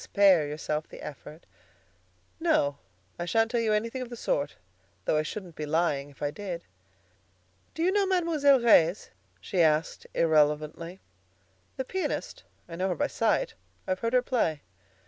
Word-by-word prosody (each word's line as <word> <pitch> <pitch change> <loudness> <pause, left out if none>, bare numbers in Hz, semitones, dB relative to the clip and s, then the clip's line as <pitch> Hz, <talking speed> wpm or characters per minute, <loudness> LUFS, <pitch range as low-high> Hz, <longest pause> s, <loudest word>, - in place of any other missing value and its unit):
Spare 190 -7 +4
yourself 150 +1 -3
the - - -11
effort." 150 +2 -10 0.9
"No; 145 - +2 0.4
I 175 - -2
shan't 225 +6 +2
tell 240 - +1
you 220 -1 +1
anything 230 +4 -1
of 250 - -5
the 240 - -7
sort, 145 -9 -1 0.5
though - - +2
I - - +3
shouldn't 175 +1 -7
be 150 - -5
lying 150 -3 0
if 140 - -11
I 145 - 0
did." 180 -2 -6 1.1
"Do 325 - -1
you 365 - +3
know 400 0 +2
Mademoiselle 325 -7 +3
Reisz?" 190 -6 +4 0.3
she 175 - 0
asked 155 0 +1
irrelevantly. 155 +2 +1 0.8
"The 265 - -2
pianist? 380 +7 -3 0.2
I 165 -1 -8
know 190 +2 0
her 180 - 0
by - - 0
sight. - - 0 0.3
I've 185 0 -1
heard 230 +1 -2
her 250 -1 +4
play." 165 - 0
180 Hz, 160 wpm, -28 LUFS, 155-235 Hz, 1.1 s, Spare